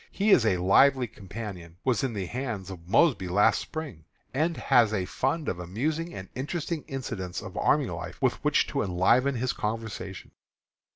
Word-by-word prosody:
He 205 +2 +1
is 115 - +6
a 95 - +3
lively 125 +9 +5
companion; 95 -5 -8
was 130 -3 +1
in 130 -3 -1
the 100 -3 -3
hands 110 -4 -4
of 85 -2 -10
Mosby 125 - +3
last 100 +4 +3
Spring; 145 - -7 0.3
and 160 +5 0
has 120 -5 +4
a 95 -4 -1
fund 130 - -1
of 90 - -2
amusing 150 - -2
and 95 -1 -7
interesting 155 +4 -3
incidents 95 -9 -4
of - - -9
army - - +3
life - - -6
with - - 0
which - - +3
to - - -1
enliven 115 +9 +2
his 125 +1 -1
conversation. 105 -4 -5
115 Hz, 170 wpm, -27 LUFS, 95-135 Hz, 0.3 s, is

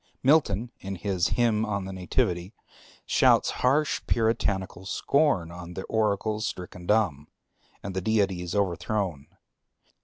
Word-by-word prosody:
Milton 125 -6 +3
in 95 0 -5
his 95 -1 0
Hymn 115 -3 +2
on 100 -3 -2
the 95 - -6
Nativity 90 +1 -1 0.5
shouts - - +4
harsh 145 +4 +2
Puritanical 95 -5 0
scorn 120 - +1
on 90 0 -9
the 95 - -4
oracles 110 0 0
stricken 90 -1 -7
dumb, 90 -10 +1 0.6
and 95 -1 -5
the 95 - -1
deities 95 -4 0
overthrown. 90 -4 -1
100 Hz, 120 wpm, -27 LUFS, 90-110 Hz, 0.6 s, shouts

